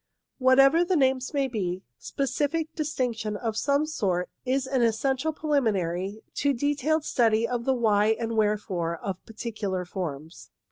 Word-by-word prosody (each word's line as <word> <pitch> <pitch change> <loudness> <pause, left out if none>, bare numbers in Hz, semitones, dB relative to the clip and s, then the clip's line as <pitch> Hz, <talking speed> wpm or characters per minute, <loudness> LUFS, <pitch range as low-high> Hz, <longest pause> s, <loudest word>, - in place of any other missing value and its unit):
Whatever 270 +5 +6
the 360 +1 +1
names 265 -3 +2
may 280 -2 +1
be, 190 -6 -3 0.2
specific 295 +3 -2
distinction 245 -9 -2
of 225 0 -3
some 280 +5 +1
sort 185 - -1 0.2
is 265 +1 +1
an 265 -1 0
essential 265 +6 +1
preliminary 210 - -1
to 285 -1 +2
detailed 290 +4 0
study 225 -1 +2
of 240 -1 -3
the 265 - +2
why 220 -2 +3
and 230 -1 -2
wherefore 200 -6 0
of 190 +2 -4
the - - -15
particular 210 -5 -3
forms. 165 -3 -6
235 Hz, 145 wpm, -26 LUFS, 205-275 Hz, 0.2 s, Whatever